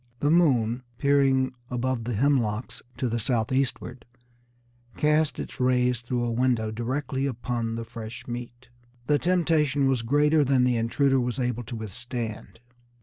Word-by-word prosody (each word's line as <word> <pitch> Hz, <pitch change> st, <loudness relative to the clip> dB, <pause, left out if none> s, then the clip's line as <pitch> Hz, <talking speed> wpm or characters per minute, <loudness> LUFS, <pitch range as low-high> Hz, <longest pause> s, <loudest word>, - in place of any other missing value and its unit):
The 145 Hz, -, +2 dB
moon, 130 Hz, -8 st, +3 dB, 0.2 s
peering 135 Hz, -2 st, +3 dB, 0.2 s
above 125 Hz, -1 st, -2 dB
the 120 Hz, -2 st, -2 dB
hemlocks 120 Hz, -3 st, 0 dB, 0.2 s
to 130 Hz, -, -1 dB
the 120 Hz, 0 st, -1 dB
southeastward, 125 Hz, +2 st, -1 dB, 0.9 s
cast 150 Hz, 0 st, +2 dB
its -, -, -7 dB
rays 125 Hz, -1 st, +2 dB
through 120 Hz, 0 st, -2 dB
a 120 Hz, -, -1 dB
window 115 Hz, -2 st, +1 dB
directly 130 Hz, +4 st, -2 dB
upon 120 Hz, -2 st, -3 dB
the 115 Hz, 0 st, -5 dB
fresh 115 Hz, -1 st, -8 dB
meat. 120 Hz, +1 st, -7 dB, 0.4 s
The 145 Hz, +2 st, +2 dB
temptation 155 Hz, -6 st, +2 dB
was 130 Hz, -3 st, +1 dB
greater 145 Hz, +5 st, +3 dB
than 135 Hz, -2 st, +3 dB
the 125 Hz, -1 st, +2 dB
intruder 130 Hz, +4 st, +2 dB
was 125 Hz, 0 st, -2 dB
able 125 Hz, -1 st, -1 dB
to 120 Hz, -, -6 dB
withstand. 115 Hz, +1 st, -6 dB
125 Hz, 145 wpm, -26 LUFS, 115-135 Hz, 0.9 s, moon